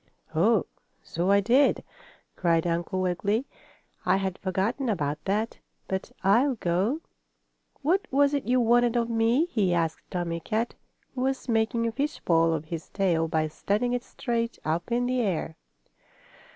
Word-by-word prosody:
"Oh, 195 +5 +3 0.4
so 175 +3 -2
I 200 0 +5
did!" 250 +8 +3 0.5
cried 170 -2 +2
Uncle 175 +2 -1
Wiggily. 200 +7 0 0.6
"I 190 - +3
had 190 -1 -3
forgotten 200 +8 -1
about 150 -7 -1
that. 210 +4 -1 0.3
But 190 0 -3
I'll 245 +8 +4
go. 200 - 0 0.8
What 375 +8 +2
was 280 +1 +3
it 285 - -1
you 250 +1 +3
wanted 240 0 +3
of 235 -1 +1
me?" 230 +7 +3
he 200 - +1
asked 165 -2 -2
Tommie 170 -2 -2
Kat, 220 +7 -2 0.4
who 255 - -4
was 265 +1 -1
making 230 0 +1
a 230 - 0
fishpole 200 - +1
of 160 -1 -2
his 160 0 -6
tail 170 -5 +1
by 155 -1 0
standing 210 +9 -1
it 245 0 -1
straight 235 -2 -3
up 170 +7 -2
in 245 +1 +1
the 250 0 +1
air. 180 -6 -1
210 Hz, 150 wpm, -27 LUFS, 175-245 Hz, 0.8 s, I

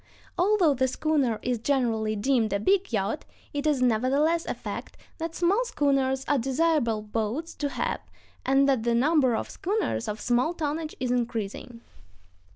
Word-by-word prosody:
Although 365 -4 +3
the 260 0 +1
schooner 270 -4 0
is 245 -2 -1
generally 225 -4 0
deemed 225 +1 +1
a 200 - +1
big 385 - +2
yacht, 215 +5 -1 0.3
it 290 +1 -1
is 280 -4 +2
nevertheless 275 +8 +2
a - - -2
fact - - -7 0.2
that 330 0 -4
small 385 +7 +2
schooners 270 - 0
are 290 -2 +2
desirable 265 -4 +1
boats 225 +9 -3
to 290 - -1
have, - - -2 0.4
and 270 +1 +3
that 265 -4 +2
the 235 +1 +1
number 265 -1 +3
of - - -2
schooners 395 - -2
of 210 0 -3
small 245 +10 +1
tonnage 310 0 -3
is 255 -1 -1
increasing. 235 -1 -3
265 Hz, 160 wpm, -27 LUFS, 235-310 Hz, 0.4 s, Although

